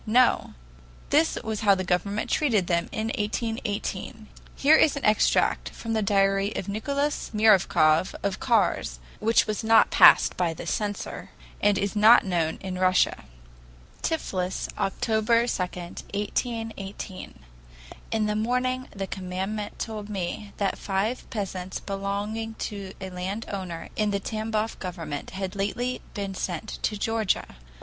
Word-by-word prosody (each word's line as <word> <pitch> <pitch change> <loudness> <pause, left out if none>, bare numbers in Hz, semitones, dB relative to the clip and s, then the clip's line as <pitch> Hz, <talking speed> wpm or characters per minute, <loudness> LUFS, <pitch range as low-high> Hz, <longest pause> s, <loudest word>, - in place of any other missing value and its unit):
No. 245 +3 +3 0.6
This 315 +2 +3
was 220 -1 -3
how 200 -2 +5
the 185 - -2
government 200 +4 -1
treated 230 - +2
them 170 -1 0
in 220 +1 -2
1818. 215 0 -3 0.3
Here 295 +3 +6
is 310 -2 +4
an 280 - -3
extract 215 0 +3
from 225 -1 -5
the 220 - +1
diary 195 0 +2
of 185 - -3
Nicholas 280 +8 -1
Myravyov 185 -6 +4
of 200 -1 -1
Kars, 205 - +1 0.2
which 225 +2 +3
was 215 +1 -3
not 225 0 +5
passed - - +7
by 170 -3 0
the - - -7
censor, 205 -1 -3 0.3
and 205 -1 +4
is 200 +2 -1
not 215 +3 +7
known 170 -4 0
in 185 -1 -4
Russia: 185 - +2 0.8
"Tiflis, 190 - -2
October 220 +4 +2
2, 235 - -1
1818. 200 +3 -4 0.7
"In 220 -1 +1
the 210 0 0
morning 250 +3 0
the 195 -1 -5
commandant 190 +3 -4
told 215 -2 -5
me 200 +1 -4
that 200 -1 -1
five 205 +5 -2
peasants 190 -3 -4
belonging 205 +3 -3
to 200 -3 -5
a 190 -1 -6
landowner 185 -2 -5
in 215 -1 +1
the 200 -1 0
Tamboff 220 +1 -2
government 165 -6 -5
had 190 0 -5
lately 240 +6 -2
been 200 -1 -3
sent 185 +2 -4
to 210 - -1
Georgia. 220 - -1
205 Hz, 135 wpm, -26 LUFS, 190-225 Hz, 0.8 s, passed